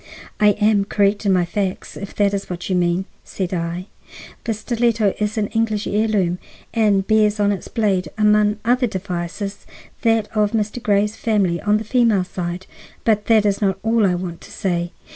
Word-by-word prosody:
"I 210 -1 +5
am 210 -2 +3
correct 205 +1 +1
in 195 - +4
my 180 -1 +2
facts, 190 +1 -3
if 200 - -8
that 205 -1 +2
is 200 0 -3
what 180 +1 -5
you - - +2
mean," 175 +1 +1 0.2
said 190 -1 -4
I. 170 +1 -3 0.6
"The 230 - 0
stiletto 230 -2 +1
is 210 +1 -1
an 215 - +1
English 220 -1 0
heirloom, 205 -4 +1 0.3
and 210 -4 +2
bears 215 -1 +3
on 205 0 +3
its 195 - -4
blade, 195 -7 0
among 210 0 +3
other 250 +1 +3
devices, 190 +1 -5 0.3
that 225 -2 +2
of 210 0 +2
Mr. 215 +2 -1
Grey's 210 -1 +1
family 200 -8 0
on 210 0 +2
the 215 - -4
female 225 -4 +2
side. 180 0 -5 0.4
But 210 -2 +1
that 220 -2 +4
is 200 0 +1
not 195 -2 +1
all 225 -2 +3
I 180 - +1
want 175 -1 -5
to - - -13
say. 175 -2 -2
205 Hz, 180 wpm, -20 LUFS, 185-215 Hz, 0.6 s, I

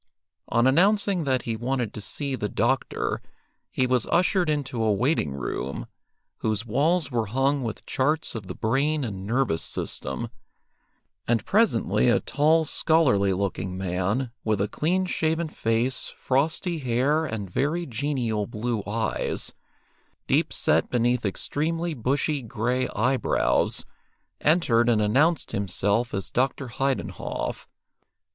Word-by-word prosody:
On 120 +1 +3
announcing 190 +4 +3
that 130 -3 +1
he 115 - -2
wanted 120 -1 -2
to 105 - -6
see 140 +6 -3
the 105 -5 -2
doctor, - - 0 0.5
he 130 - +1
was 125 -2 +1
ushered 180 -1 +2
into 140 -5 -1
a 110 - +3
waiting 105 - +1
room, 65 0 -4 0.5
whose 110 0 -1
walls 145 +6 +1
were 115 -3 0
hung 135 +5 +1
with 115 -3 -5
charts 150 +4 0
of 110 -5 -6
the - - -6
brain 140 +6 +1
and 100 -5 -5
nervous 120 -8 +1
system, 65 -1 -3 1.0
and 120 -1 +1
presently 125 - +3
a 120 - +4
tall, 155 +2 +2
scholarly 135 -12 +3
looking 95 -1 -2
man, 95 +7 -1
with 110 -2 +1
a 100 - +1
clean 180 - 0
shaven 160 -2 0
face, 115 -1 0
frosty 160 +6 0
hair, 135 +4 +1
and 105 -6 -4
very 150 - -1
genial 120 -5 -1
blue 115 0 -2
eyes, 110 0 -2 0.7
deep - - +2
set 80 +2 +2
beneath 120 -2 +1
extremely 165 - -2
bushy 140 +3 0
grey 125 +2 -1
eyebrows, 125 +4 +1 0.5
entered 120 -8 +3
and 115 -2 +3
announced 140 +10 +2
himself 100 +4 0
as 100 -2 -4
Dr. 130 +1 0
Heidenhoff. 135 +2 -3
125 Hz, 130 wpm, -25 LUFS, 110-150 Hz, 1.0 s, a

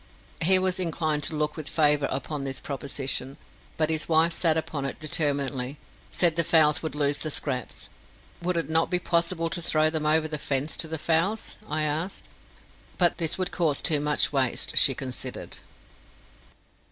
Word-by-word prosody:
He 190 +3 +6
was 185 0 0
inclined 160 -4 -1
to 160 - +3
look 150 0 -1
with 155 -3 -6
favour 150 -3 +2
upon 140 +2 -4
this 135 -1 -3
proposition, 135 -1 -3 0.4
but 155 0 +1
his 155 0 0
wife 165 +1 +4
sat 165 -2 +2
upon 155 -3 -3
it 135 - -4
determinedly 140 -3 -1 0.3
said 170 -3 +2
the 170 - +2
fowls 155 -2 +4
would 155 -3 -5
lose 145 -1 +1
the 155 - 0
scraps. 130 -4 -2 0.5
"Would 175 0 -1
it 165 -4 -1
not 160 +1 +1
be 180 - +2
possible 170 -1 0
to 175 - -2
throw 155 -1 +2
them 155 -1 -2
over 155 +1 +3
the 155 -1 -4
fence 140 +2 -1
to 160 - +2
the 160 0 -3
fowls?" 170 +8 0
I 155 +1 0
asked; 155 +5 -2 0.7
but 175 -1 +2
this 165 -2 0
would 185 -1 -2
cause 160 -5 +1
too 155 -4 +3
much 150 0 +1
waste, 130 -3 -1
she 135 - +5
considered. 130 -1 -5
155 Hz, 175 wpm, -26 LUFS, 145-165 Hz, 0.7 s, He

